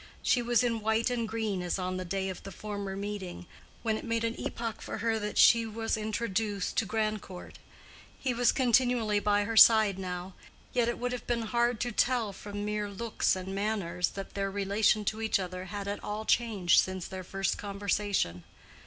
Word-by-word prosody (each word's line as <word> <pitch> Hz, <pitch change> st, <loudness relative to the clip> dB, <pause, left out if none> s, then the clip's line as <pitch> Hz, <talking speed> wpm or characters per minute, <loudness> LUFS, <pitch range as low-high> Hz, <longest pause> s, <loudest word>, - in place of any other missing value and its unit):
She 250 Hz, -, +3 dB
was 240 Hz, +1 st, +2 dB
in 230 Hz, -2 st, 0 dB
white 220 Hz, +3 st, +1 dB
and 235 Hz, -2 st, -1 dB
green 220 Hz, -4 st, -2 dB
as 175 Hz, +1 st, -1 dB
on 185 Hz, 0 st, -2 dB
the 185 Hz, -, -3 dB
day 190 Hz, +2 st, -2 dB
of 185 Hz, -2 st, -5 dB
the 195 Hz, -, -9 dB
former 200 Hz, 0 st, -5 dB
meeting, 195 Hz, -3 st, -5 dB, 0.4 s
when 220 Hz, -2 st, 0 dB
it -, -, -10 dB
made 230 Hz, -1 st, -1 dB
an 230 Hz, 0 st, 0 dB
epoch 230 Hz, -2 st, -4 dB
for -, -, -5 dB
her 225 Hz, 0 st, 0 dB
that 210 Hz, 0 st, -4 dB
she 230 Hz, -1 st, +7 dB
was 225 Hz, +1 st, -2 dB
introduced 215 Hz, -2 st, -2 dB
to 220 Hz, -, +2 dB
Grandcourt; 215 Hz, -4 st, -3 dB, 0.6 s
he 260 Hz, -2 st, -1 dB
was 240 Hz, 0 st, +3 dB
continually 245 Hz, -4 st, +2 dB
by 205 Hz, 0 st, +2 dB
her 225 Hz, +2 st, -3 dB
side 220 Hz, -3 st, +7 dB
now, 180 Hz, 0 st, -5 dB, 0.4 s
yet 240 Hz, -2 st, +2 dB
it 240 Hz, -, -2 dB
would 245 Hz, +1 st, -2 dB
have 250 Hz, -, -5 dB
been 235 Hz, -1 st, 0 dB
hard 235 Hz, +1 st, +1 dB
to 245 Hz, -, -1 dB
tell 235 Hz, -2 st, +1 dB
from 205 Hz, +1 st, -6 dB
mere 210 Hz, 0 st, -2 dB
looks 215 Hz, +1 st, 0 dB
and 185 Hz, +1 st, -5 dB
manners 195 Hz, -4 st, -1 dB
that 195 Hz, -1 st, -8 dB
their 195 Hz, 0 st, -1 dB
relation 205 Hz, +2 st, +1 dB
to 215 Hz, +2 st, -1 dB
each 220 Hz, -, +2 dB
other 185 Hz, -1 st, -5 dB
had 200 Hz, +2 st, -5 dB
at 205 Hz, -, -4 dB
all 210 Hz, +1 st, -4 dB
changed 210 Hz, -8 st, +3 dB
since 185 Hz, -1 st, -1 dB
their 190 Hz, -1 st, -6 dB
first 195 Hz, +2 st, -2 dB
conversation. 200 Hz, -, -1 dB
210 Hz, 195 wpm, -30 LUFS, 195-230 Hz, 0.6 s, she